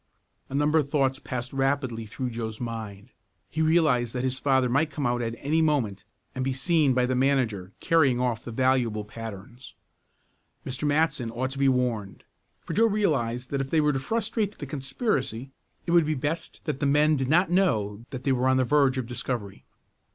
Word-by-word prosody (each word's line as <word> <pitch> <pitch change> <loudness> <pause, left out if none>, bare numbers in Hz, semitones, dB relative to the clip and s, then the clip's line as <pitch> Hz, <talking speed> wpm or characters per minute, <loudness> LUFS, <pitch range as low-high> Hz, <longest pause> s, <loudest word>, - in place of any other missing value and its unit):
A 135 - -5
number 150 +2 +3
of 140 -2 -2
thoughts 135 -2 +1
passed 125 -2 -5
rapidly 135 -4 -1
through 120 +3 -4
Joe's 110 -2 -5
mind. 110 -2 -6 0.4
He 160 - -1
realized 155 -8 +3
that 125 - -2
his 130 0 -1
father 130 -2 +2
might 145 +6 +1
come 145 -1 -4
out 120 0 +1
at 115 -1 -3
any 155 +5 +1
moment 125 -11 0 0.3
and 130 - -3
be 135 0 0
seen 140 0 +2
by 125 -1 +3
the 130 - 0
manager 125 -8 +1
carrying 140 -7 +3
off 120 -3 -1
the 120 - -7
valuable 120 -4 +1
patterns. 115 +3 -9 0.9
Mr. 130 +3 -3
Matson 150 -4 +1
ought 130 +3 -3
to 135 - -6
be 140 -1 +4
warned, 120 -6 -1 0.4
for - - -6
Joe 230 +2 +4
realized 135 - 0
that 140 -1 0
if 135 - -4
they 160 - +2
were 150 -1 +3
to 135 - -1
frustrate 215 - -2
the 145 - -6
conspiracy 135 - -2 0.3
it 170 - -2
would 170 -3 +5
be 155 - 0
best 155 +4 -3
that 150 -3 -3
the 145 - +1
men 150 +2 +4
did 130 -2 -1
not 175 +3 +3
know 110 - +1
that 130 -2 -7
they 140 - +1
were 130 0 +2
on 130 0 +4
the 130 - +2
verge 140 -1 +3
of 130 - -2
discovery. 120 -4 -4
130 Hz, 195 wpm, -26 LUFS, 120-150 Hz, 0.9 s, would